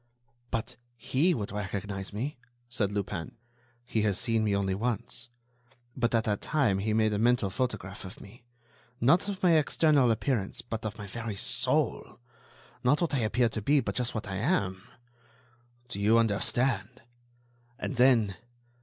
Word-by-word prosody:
"But 115 - -3 0.2
he 160 +9 +2
would 105 -6 -4
recognize 100 -1 -4
me," 125 +6 -4 0.3
said 110 -5 -1
Lupin. 95 -4 -4 0.5
"He 115 -3 0
has 105 -3 +1
seen 115 -2 +1
me 105 -2 +1
only 95 -1 0
once; 120 +3 -3 0.7
but, 120 -2 +1
at 115 - +3
that 105 -2 -1
time, 130 -11 +1
he 110 +2 -1
made 110 0 +2
a 105 - 0
mental 120 -3 +2
photograph 105 -7 -3
of 95 0 -9
me—not 120 - -2
of 195 -2 -5
my 170 -3 +6
external 150 -3 +3
appearance 115 -1 -1
but 115 -1 -4
of 110 +1 -7
my 105 - -7
very 110 +1 -5
soul—not 125 - -2
what 170 -3 -1
I 140 - +2
appear 120 +1 +2
to 110 - -4
be 145 +7 +3
but - - -2
just 125 -2 -2
what 110 - -3
I 95 -1 -3
am. 95 - 0 1.1
Do 120 -5 -6
you 105 +3 +4
understand? 120 +3 +1 0.7
And 140 -1 -4
then 115 -6 +4
115 Hz, 155 wpm, -29 LUFS, 100-125 Hz, 1.1 s, my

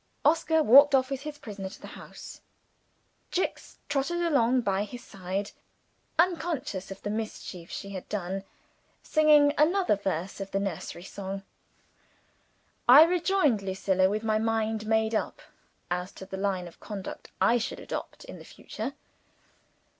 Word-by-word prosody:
Oscar 320 0 +3
walked 280 +3 +8
off 260 0 +2
with 270 -1 -3
his 300 0 -7
prisoner 200 -7 -7
to - - -12
the - - -11
house. - - -11 0.9
Jicks 365 - -3
trotted 290 +5 -1
along 255 -6 +3
by 200 -3 0
his 240 +3 -8
side, 195 +1 -4 0.7
unconscious 320 - 0
of 195 0 -9
the 205 - -2
mischief 210 -5 -5
she 200 - -6
had 185 -2 -7
done, 195 -1 -3 0.6
singing 300 -2 +5
another 355 - +4
verse 190 -2 -3
of 195 - -5
the 195 - -1
nursery 175 -3 -4
song. 195 0 -6 1.5
I 275 +5 +11
rejoined 340 - +2
Lucilla, 190 -1 +1
with 215 +2 -2
my 215 -1 +1
mind 220 -1 -1
made 220 0 +2
up 220 - -1 0.5
as 180 +1 -2
to 190 - -10
the 190 - -7
line 190 -2 -1
of 170 - -15
conduct 200 -3 -7
I 230 +6 +4
should 225 - -4
adopt - - -6
in - - -10
the - - -11
future. - - -7
215 Hz, 145 wpm, -28 LUFS, 195-290 Hz, 1.5 s, I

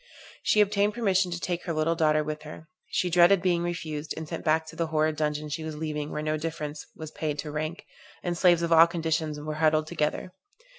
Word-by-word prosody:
She 210 - +4
obtained 205 0 +2
permission 195 -6 +2
to 175 0 -4
take 175 -1 -3
her 170 - -2
little 155 +1 +1
daughter 155 -2 +2
with 155 0 -5
her. 155 +1 -10 0.2
She 180 - 0
dreaded 175 +3 +6
being 175 -1 +1
refused, 160 -3 -4
and 160 -1 -5
sent - - -5
back 160 +1 +2
to 160 - -11
the 165 0 -1
horrid 155 0 +1
dungeon 150 0 -2
she 155 +2 -4
was 155 -1 -5
leaving 150 -1 -3
where 150 - -4
no 155 0 0
difference 155 -1 -5
was 155 -1 -8
paid 150 -2 -3
to 150 +1 -5
rank, 155 +6 -4 0.4
and 175 -1 -1
slaves 175 -1 +4
of 170 - -1
all 165 +1 +8
conditions 160 -3 -2
were 155 +1 -4
huddled 155 -1 +3
together. 155 +2 -2
160 Hz, 215 wpm, -27 LUFS, 155-175 Hz, 0.4 s, all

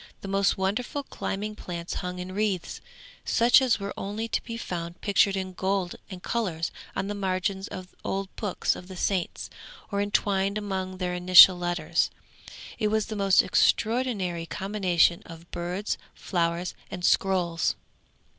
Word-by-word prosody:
The - - -7
most 195 0 +2
wonderful 215 +9 -1
climbing 210 -4 -4
plants 170 -3 -6
hung 180 -1 -4
in 180 +1 -6
wreaths, 195 -2 -2 0.4
such 240 +3 +5
as 255 -4 +3
are 200 0 -4
only 210 +3 -4
to - - 0
be 230 -1 -6
found 170 -4 -5
pictured 200 -1 +3
in 185 -1 -4
gold 190 0 -1
and 185 -2 -9
colours 180 -9 -1 0.2
on - - -1
the 205 - -3
margins 190 0 -1
of 185 -1 -8
old 195 0 -3
books 205 -4 -1
of 180 - -10
the 190 - -9
Saints 185 -1 -1 0.4
or 200 0 0
entwined 200 0 +1
among 190 -3 -3
their 180 -1 -2
initial 180 +1 +9
letters. 175 -2 0 0.7
It 215 - +2
was 215 0 +1
the 215 - -5
most 195 -2 +4
extraordinary 210 -8 +1
combination 190 -4 +1
of 165 +1 -12
birds, 180 +4 -3 0.2
flowers 170 0 -1 0.2
and 175 - -4
scrolls. 180 -3 +2
190 Hz, 150 wpm, -27 LUFS, 180-205 Hz, 0.7 s, initial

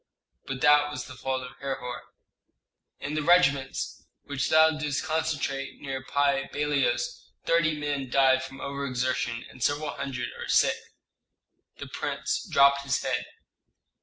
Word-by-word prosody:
"But 135 -1 -4
that 145 0 +5
was 145 - -5
the - - -10
fault 130 0 -3
of 125 - -9
Herhor." 135 -3 -4 1.0
"In 145 - -4
the 155 - 0
regiments 140 -5 +2 0.2
which 140 -1 -2
thou 160 0 +6
didst 150 -2 -2
concentrate 155 -4 -2
near 135 -1 -5
Pi 140 0 +1
Bailos 150 - 0 0.2
thirty 160 -2 +2
men 145 -3 -2
died 130 0 +4
from 135 0 -9
over 140 0 -3
exertion, 125 -2 -1
and 125 - -15
several 145 +4 0
hundred 125 -3 -4
are - - -5
sick." - - +4 1.0
The - - -7
prince - - -3
dropped 140 0 +5
his 135 -2 0
head. - - -1
140 Hz, 140 wpm, -27 LUFS, 135-150 Hz, 1.0 s, thou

